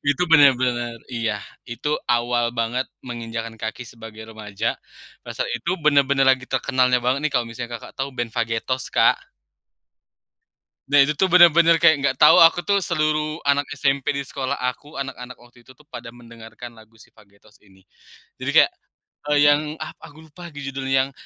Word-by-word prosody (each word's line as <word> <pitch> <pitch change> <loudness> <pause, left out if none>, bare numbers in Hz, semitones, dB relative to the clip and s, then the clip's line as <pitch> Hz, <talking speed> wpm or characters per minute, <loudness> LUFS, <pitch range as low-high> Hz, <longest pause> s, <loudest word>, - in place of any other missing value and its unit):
itu 145 - -1
bener-bener 125 -5 +3 0.2
iya, 115 -3 -2 0.3
itu 120 +5 -5 0.2
awal 120 0 +1
banget 120 +3 -1 0.2
menginjakkan 115 -1 -6
kaki 110 +2 -5
sebagai 110 -2 -12
remaja, 105 0 -4 0.5
pada - - -9
saat - - -3
itu 125 +9 -4
bener-bener 140 -2 +3
lagi 130 0 0
terkenalnya 130 -1 +1
banget 130 +2 +1
nih, 150 - -5
kalau 120 -1 +1
misalnya 120 +1 -7
Kakak - - -14
tahu 135 +1 -2
band 120 -2 -3
Vagetoz, 115 +2 -2
Kak. - - +4 1.7
Nah, 145 - +3
itu 150 - -1
tuh 190 +5 +1
bener-bener 170 -1 +6
kayak 165 -2 +5
nggak 135 -2 0
tahu 150 - +7
aku 170 +1 +5
tuh, 200 -1 +1
seluruh 155 -2 -1
anak 140 0 +1
SMP 135 -1 0
di 140 - -3
sekolah 130 0 -4
aku, 125 +4 -5
anak-anak 125 -2 -7
waktu 120 0 -21
itu 130 +1 -19
tuh 150 - -22
pada 120 -5 -10
mendengarkan 115 0 -13
lagu 110 0 -19
si 110 - -20
Vagetoz 105 0 -24
ini. 95 -2 -24 0.6
Jadi, - - -3
kayak, - - +1 0.6
eee, 145 - +3
yang 145 0 +2 0.2
ah, - - -8
aku 155 +2 -14
lupa 175 +3 -11
judulnya 135 -1 -2
yang, - - -19
130 Hz, 165 wpm, -21 LUFS, 115-145 Hz, 1.7 s, tahu